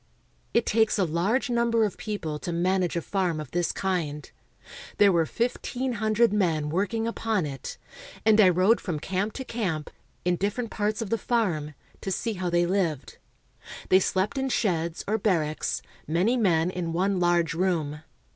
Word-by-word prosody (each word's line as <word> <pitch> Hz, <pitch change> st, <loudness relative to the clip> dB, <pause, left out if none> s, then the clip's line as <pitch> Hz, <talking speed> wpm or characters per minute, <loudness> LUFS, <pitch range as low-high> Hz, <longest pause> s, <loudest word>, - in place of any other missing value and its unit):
It 235 Hz, -, +2 dB
takes 220 Hz, 0 st, +2 dB
a 195 Hz, -, +3 dB
large 190 Hz, +9 st, +1 dB
number 235 Hz, -1 st, +2 dB
of 205 Hz, -, -3 dB
people 165 Hz, -8 st, -4 dB
to 175 Hz, -, -4 dB
manage 180 Hz, +1 st, +1 dB
a 170 Hz, -, -1 dB
farm 180 Hz, -5 st, -1 dB
of 150 Hz, -4 st, -7 dB
this 175 Hz, 0 st, 0 dB
kind. 160 Hz, -7 st, -2 dB, 0.7 s
There 205 Hz, -1 st, +6 dB
were 165 Hz, -3 st, +2 dB
fifteen 245 Hz, +1 st, -2 dB
hundred 220 Hz, 0 st, +3 dB
men 165 Hz, -7 st, +1 dB
working 205 Hz, +7 st, 0 dB
upon 225 Hz, -5 st, -1 dB
it, 135 Hz, -3 st, -6 dB, 0.5 s
and 220 Hz, 0 st, +6 dB
I 190 Hz, -, +7 dB
rode 185 Hz, +6 st, +3 dB
from 165 Hz, -5 st, -3 dB
camp 195 Hz, +6 st, -2 dB
to 265 Hz, -, -6 dB
camp, 180 Hz, -12 st, -3 dB, 0.3 s
in 180 Hz, 0 st, +2 dB
different 210 Hz, +5 st, -2 dB
parts 210 Hz, +2 st, -1 dB
of 200 Hz, -, -8 dB
the 230 Hz, -, +1 dB
farm, 170 Hz, -, -1 dB, 0.3 s
to -, -, -4 dB
see 225 Hz, +4 st, -1 dB
how 185 Hz, -2 st, -2 dB
they 175 Hz, 0 st, +2 dB
lived. 170 Hz, -7 st, -1 dB, 0.7 s
They 185 Hz, -, +7 dB
slept 190 Hz, +7 st, 0 dB
in 265 Hz, 0 st, -1 dB
sheds, 170 Hz, -8 st, 0 dB
or 220 Hz, +2 st, +1 dB
barracks, 160 Hz, -7 st, 0 dB, 0.2 s
many 180 Hz, -, +2 dB
men 180 Hz, -7 st, +2 dB
in 170 Hz, -3 st, -3 dB
one 190 Hz, +2 st, +1 dB
large 175 Hz, -2 st, +2 dB
room. 165 Hz, -4 st, -1 dB
185 Hz, 170 wpm, -26 LUFS, 170-220 Hz, 0.7 s, I